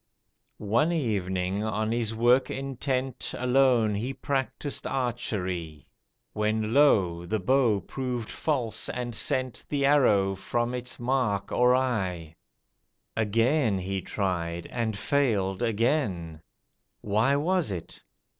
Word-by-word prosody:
One 115 Hz, +10 st, +1 dB
evening, 100 Hz, -, -1 dB
on 110 Hz, 0 st, -1 dB
his 115 Hz, -1 st, -1 dB
work 120 Hz, +3 st, +3 dB
intent, 135 Hz, -1 st, -3 dB
Alone 125 Hz, -3 st, +3 dB
he 120 Hz, +7 st, -3 dB
practised 135 Hz, +2 st, -2 dB
Archery, 95 Hz, -, -3 dB, 0.4 s
When 110 Hz, +1 st, 0 dB
lo! 90 Hz, -12 st, +3 dB
the 110 Hz, +4 st, -1 dB
bow 115 Hz, -1 st, +2 dB
proved 125 Hz, +2 st, -4 dB
false 130 Hz, -8 st, -1 dB
and 120 Hz, -1 st, -4 dB
sent 130 Hz, +2 st, 0 dB
The 140 Hz, -2 st, 0 dB
arrow 105 Hz, -9 st, +4 dB
from 120 Hz, +5 st, -2 dB
its 125 Hz, 0 st, -3 dB
mark 120 Hz, -6 st, 0 dB
awry; 110 Hz, -11 st, +1 dB, 0.8 s
Again 115 Hz, +2 st, +2 dB
he 95 Hz, +1 st, -3 dB
tried, 85 Hz, -3 st, -2 dB
and 115 Hz, -4 st, -2 dB
failed 100 Hz, -9 st, 0 dB
again; 110 Hz, -, 0 dB, 0.6 s
Why 110 Hz, +7 st, +2 dB
was 170 Hz, -, +1 dB
it? 90 Hz, -4 st, -7 dB
115 Hz, 110 wpm, -27 LUFS, 100-130 Hz, 0.8 s, arrow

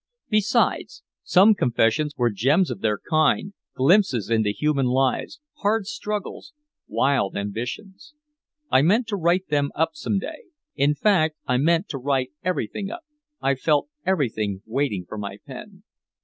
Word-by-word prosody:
Besides, 215 Hz, -, +1 dB, 0.2 s
some 200 Hz, +4 st, +6 dB
confessions 145 Hz, -, +1 dB
were 120 Hz, -1 st, +2 dB
gems 140 Hz, -, +2 dB
of -, -, -5 dB
their 105 Hz, -1 st, +1 dB
kind, 155 Hz, -, +1 dB, 0.2 s
glimpses 135 Hz, -, +3 dB
into 110 Hz, -2 st, +2 dB
human 135 Hz, +5 st, 0 dB
lives, 135 Hz, -, 0 dB, 0.2 s
hard 205 Hz, 0 st, 0 dB
struggles, 210 Hz, +7 st, -5 dB, 0.3 s
wild 135 Hz, -7 st, +1 dB
ambitions. 125 Hz, -, -6 dB, 0.6 s
I 130 Hz, -, +5 dB
meant 210 Hz, -, +3 dB
to 205 Hz, -, -1 dB
write 180 Hz, +1 st, +1 dB
them 145 Hz, -1 st, +1 dB
up 160 Hz, +1 st, +1 dB
some 160 Hz, +6 st, -2 dB
day. 450 Hz, -, -6 dB, 0.3 s
In 145 Hz, +1 st, +2 dB
fact, 160 Hz, -5 st, +2 dB
I 125 Hz, -, +1 dB
meant 165 Hz, +6 st, +2 dB
to 135 Hz, -, -4 dB
write 130 Hz, -1 st, -1 dB
everything 185 Hz, -, -2 dB
up, 335 Hz, +10 st, -8 dB, 0.4 s
I 135 Hz, -, +2 dB
felt 145 Hz, -, +1 dB
everything 110 Hz, -, -1 dB
waiting 110 Hz, -6 st, -2 dB
for 110 Hz, -, -7 dB
my 100 Hz, -1 st, -6 dB
pen. 190 Hz, +8 st, -11 dB
150 Hz, 145 wpm, -23 LUFS, 125-195 Hz, 0.6 s, some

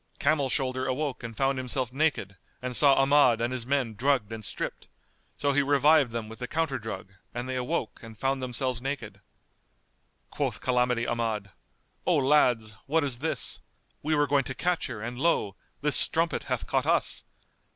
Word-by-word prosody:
Camel 140 Hz, -2 st, +2 dB
shoulder 130 Hz, -1 st, 0 dB
awoke 135 Hz, -1 st, -2 dB
and 115 Hz, -2 st, -7 dB
found 135 Hz, -1 st, +1 dB
himself 125 Hz, -1 st, -2 dB
naked 145 Hz, -9 st, 0 dB, 0.2 s
and 125 Hz, -1 st, -4 dB
saw 140 Hz, 0 st, +6 dB
Ahmad 135 Hz, -3 st, +5 dB
and 120 Hz, +2 st, -1 dB
his 125 Hz, -2 st, -4 dB
men 135 Hz, -5 st, 0 dB
drugged 120 Hz, -1 st, +1 dB
and 110 Hz, -1 st, -6 dB
stripped: -, -, -5 dB, 0.5 s
so 145 Hz, -1 st, +1 dB
he 145 Hz, -, +4 dB
revived 140 Hz, -1 st, +4 dB
them 115 Hz, -1 st, -4 dB
with 110 Hz, +1 st, -10 dB
the 125 Hz, -, -4 dB
counter 160 Hz, -3 st, -1 dB
drug 95 Hz, -3 st, -7 dB, 0.2 s
and 120 Hz, +1 st, -3 dB
they 130 Hz, -, -3 dB
awoke 125 Hz, -3 st, -2 dB
and 115 Hz, -1 st, -11 dB
found 135 Hz, +2 st, 0 dB
themselves 130 Hz, -1 st, -2 dB
naked. 135 Hz, +1 st, -5 dB, 1.1 s
Quoth -, -, -2 dB
Calamity 125 Hz, -2 st, +1 dB
Ahmad, 110 Hz, -4 st, -2 dB, 0.6 s
"O 175 Hz, -, +4 dB
lads, 125 Hz, -7 st, +3 dB
what 160 Hz, +2 st, +2 dB
is 130 Hz, -4 st, -2 dB
this? 160 Hz, +3 st, -3 dB, 0.4 s
We 155 Hz, +1 st, +1 dB
were 145 Hz, 0 st, +3 dB
going 140 Hz, -1 st, +2 dB
to 130 Hz, -, -5 dB
catch 180 Hz, -1 st, 0 dB
her, 115 Hz, -5 st, -6 dB
and 120 Hz, +1 st, -5 dB
lo! 105 Hz, -, +1 dB, 0.3 s
this 150 Hz, -1 st, +3 dB
strumpet 165 Hz, 0 st, +2 dB
hath -, -, -2 dB
caught -, -, 0 dB
us! -, -, +1 dB
130 Hz, 175 wpm, -28 LUFS, 120-145 Hz, 1.1 s, saw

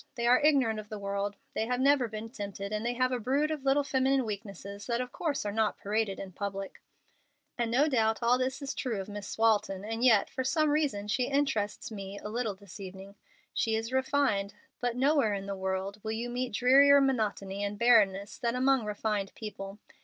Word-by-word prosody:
They 235 Hz, -2 st, -2 dB
are 245 Hz, +1 st, +6 dB
ignorant 270 Hz, -7 st, +3 dB
of 210 Hz, 0 st, -9 dB
the 215 Hz, -, -5 dB
world; 200 Hz, 0 st, -3 dB, 0.2 s
they 220 Hz, -, -1 dB
have 250 Hz, 0 st, 0 dB
never 275 Hz, -2 st, +4 dB
been 220 Hz, +1 st, -7 dB
tempted, 200 Hz, -4 st, -6 dB
and 210 Hz, +1 st, -2 dB
they 240 Hz, +1 st, 0 dB
have 255 Hz, +1 st, +1 dB
a 250 Hz, -, -1 dB
brood 275 Hz, +7 st, +1 dB
of 300 Hz, -3 st, -4 dB
little 275 Hz, +1 st, +3 dB
feminine 265 Hz, -1 st, +1 dB
weaknesses 200 Hz, -1 st, -7 dB
that 235 Hz, -1 st, 0 dB
of 250 Hz, 0 st, -3 dB
course 295 Hz, -8 st, -2 dB
are 205 Hz, -, -1 dB
not 220 Hz, 0 st, 0 dB
paraded 210 Hz, -1 st, -1 dB
in 195 Hz, -, -7 dB
public. 195 Hz, +1 st, -5 dB, 0.7 s
"And 235 Hz, -2 st, -1 dB
no 265 Hz, +6 st, +3 dB
doubt 225 Hz, -6 st, +2 dB
all 245 Hz, +2 st, +4 dB
this 260 Hz, +3 st, -2 dB
is 275 Hz, -, -3 dB
true 235 Hz, -6 st, -2 dB
of 190 Hz, -, -5 dB
Miss 205 Hz, -1 st, -6 dB
Walton, 210 Hz, -3 st, +2 dB
and 225 Hz, +2 st, -3 dB
yet, 225 Hz, -6 st, +5 dB
for 260 Hz, -, -4 dB
some 310 Hz, +3 st, +2 dB
reason, 280 Hz, -10 st, 0 dB
she 245 Hz, +4 st, +1 dB
interests 275 Hz, -8 st, -1 dB
me 200 Hz, -1 st, -7 dB
a 210 Hz, -, -7 dB
little 225 Hz, -2 st, -2 dB
this 200 Hz, 0 st, -13 dB
evening. 195 Hz, +1 st, -9 dB, 0.4 s
She 225 Hz, -1 st, +1 dB
is 225 Hz, +3 st, -3 dB
refined, 260 Hz, -7 st, +1 dB, 0.2 s
but 245 Hz, -1 st, -1 dB
nowhere 265 Hz, -5 st, +3 dB
in 195 Hz, 0 st, -5 dB
the 200 Hz, 0 st, -4 dB
world 190 Hz, +1 st, -3 dB
will 220 Hz, 0 st, -2 dB
you 235 Hz, +2 st, -3 dB
meet 250 Hz, -1 st, -3 dB
drearier 275 Hz, +4 st, +6 dB
monotony 210 Hz, -7 st, 0 dB
and 205 Hz, 0 st, -3 dB
barrenness 205 Hz, -4 st, +3 dB
than 235 Hz, 0 st, 0 dB
among 260 Hz, -2 st, +2 dB
refined 210 Hz, -1 st, -2 dB
people. 195 Hz, -2 st, -7 dB
225 Hz, 205 wpm, -30 LUFS, 200-255 Hz, 0.7 s, are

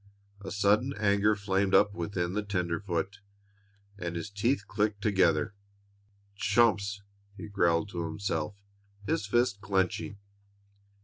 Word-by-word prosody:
A -, -, -5 dB
sudden 105 Hz, +7 st, +2 dB
anger 105 Hz, 0 st, +3 dB
flamed 100 Hz, -1 st, +1 dB
up 100 Hz, 0 st, +5 dB
within 90 Hz, -1 st, -2 dB
the 105 Hz, -, 0 dB
tenderfoot, 95 Hz, -1 st, -2 dB, 0.8 s
and 85 Hz, -2 st, -4 dB
his 95 Hz, +5 st, -5 dB
teeth 105 Hz, +2 st, 0 dB
clicked 105 Hz, -1 st, 0 dB
together. 90 Hz, -4 st, +2 dB, 0.8 s
"Chumps!" 105 Hz, -1 st, +2 dB, 0.3 s
he 95 Hz, -, -7 dB
growled 85 Hz, -2 st, +1 dB
to 85 Hz, -4 st, -3 dB
himself, 80 Hz, 0 st, -3 dB, 0.5 s
his 100 Hz, 0 st, -1 dB
fists 120 Hz, -2 st, +2 dB
clenching. 95 Hz, +1 st, -1 dB
100 Hz, 115 wpm, -29 LUFS, 90-105 Hz, 0.8 s, up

